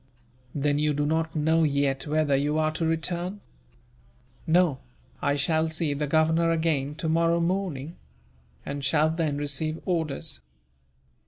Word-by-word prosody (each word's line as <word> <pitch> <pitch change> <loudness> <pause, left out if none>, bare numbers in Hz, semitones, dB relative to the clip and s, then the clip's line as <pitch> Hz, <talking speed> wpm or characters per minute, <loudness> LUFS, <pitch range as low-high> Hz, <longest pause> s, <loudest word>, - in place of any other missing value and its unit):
"Then 145 0 +1
you 150 -1 +1
do 145 0 0
not 160 +1 0
know 160 +2 +2
yet 140 -2 +1
whether 150 -2 +2
you 145 +3 +1
are 155 0 +2
to 160 +1 -1
return?" 175 +4 -2 1.1
"No; 165 -4 +3 0.4
I 140 - +1
shall 160 +2 +1
see 160 -2 -1
the 145 +1 -2
Governor 160 +2 +3
again, 160 -4 0
tomorrow 165 +1 +1
morning; 170 -4 -2 0.7
and 140 0 -4
shall 155 +3 +3
then 160 -3 -1
receive 145 +2 -2
orders." 160 - -2
155 Hz, 135 wpm, -26 LUFS, 145-165 Hz, 1.1 s, No